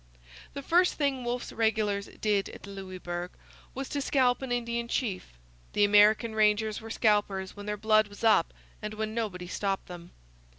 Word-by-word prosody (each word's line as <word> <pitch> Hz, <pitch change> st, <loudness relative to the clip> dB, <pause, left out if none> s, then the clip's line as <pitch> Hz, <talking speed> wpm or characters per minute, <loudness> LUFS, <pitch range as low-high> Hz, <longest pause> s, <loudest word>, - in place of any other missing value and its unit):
The 280 Hz, -, -6 dB
first 355 Hz, +5 st, +3 dB
thing 275 Hz, -4 st, 0 dB
Wolfe's 240 Hz, +1 st, -3 dB
regulars 215 Hz, -3 st, 0 dB
did 205 Hz, -2 st, -1 dB
at -, -, -11 dB
Louisbourg 185 Hz, -3 st, -6 dB, 0.5 s
was 270 Hz, 0 st, -4 dB
to 285 Hz, -, -2 dB
scalp 260 Hz, -3 st, +2 dB
an 265 Hz, -2 st, -5 dB
Indian 235 Hz, -1 st, -1 dB
chief. 195 Hz, -, -3 dB, 0.4 s
The 205 Hz, -, +3 dB
American 210 Hz, +2 st, +5 dB
rangers 215 Hz, 0 st, +2 dB
were 225 Hz, -, -9 dB
scalpers 205 Hz, -4 st, +1 dB
when 205 Hz, 0 st, -9 dB
their 210 Hz, 0 st, -2 dB
blood 215 Hz, 0 st, +3 dB
was 205 Hz, +2 st, -13 dB
up 220 Hz, -7 st, +4 dB, 0.3 s
and 210 Hz, 0 st, -5 dB
when 215 Hz, 0 st, -3 dB
nobody 205 Hz, -6 st, -3 dB
stopped 195 Hz, +2 st, -2 dB
them. 175 Hz, -1 st, -10 dB
215 Hz, 165 wpm, -29 LUFS, 200-235 Hz, 0.5 s, American